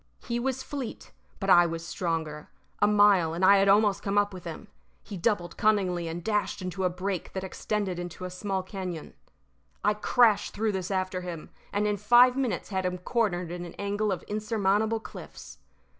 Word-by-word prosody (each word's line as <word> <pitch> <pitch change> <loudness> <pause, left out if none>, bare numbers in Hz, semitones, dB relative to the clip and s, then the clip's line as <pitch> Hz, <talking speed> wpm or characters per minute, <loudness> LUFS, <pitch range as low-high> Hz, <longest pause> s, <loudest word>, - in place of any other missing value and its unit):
He 235 0 -1
was 265 +1 -2
fleet, 270 -5 -6 0.3
but 195 - -3
I 175 0 +7
was 165 0 -5
stronger. 160 -4 -3 0.3
A 205 - +6
mile, 205 -6 +4
and 180 +2 +2
I 200 +1 +7
had 195 0 +3
almost 205 0 +4
come 200 0 -1
up 205 -1 +2
with 180 -2 -9
him. 170 +6 -7 0.4
He 205 - -8
doubled 175 -2 -1
cunningly 185 -5 +1
and 165 +1 -5
dashed 210 -2 -1
into 185 0 -3
a - - +3
brake 185 0 -4
that 190 - -4
extended 190 -1 -3
into 175 +1 -6
a 180 - -5
small 190 +1 -3
cañon. 185 -4 -6 0.7
I 210 - +3
crashed 210 0 +3
through 220 +1 0
this 185 -2 -3
after 185 -1 -1
him, 175 -3 -7 0.2
and 205 +1 0
in 210 -1 0
five 240 +5 +6
minutes 265 -4 -2
had 190 -2 -1
him 180 0 -1
cornered 180 -3 -1
in 175 0 -5
an 175 - -9
angle 205 +1 -1
of 185 - -3
insurmountable 215 +1 0
cliffs. - - -11
195 Hz, 190 wpm, -28 LUFS, 180-210 Hz, 0.7 s, I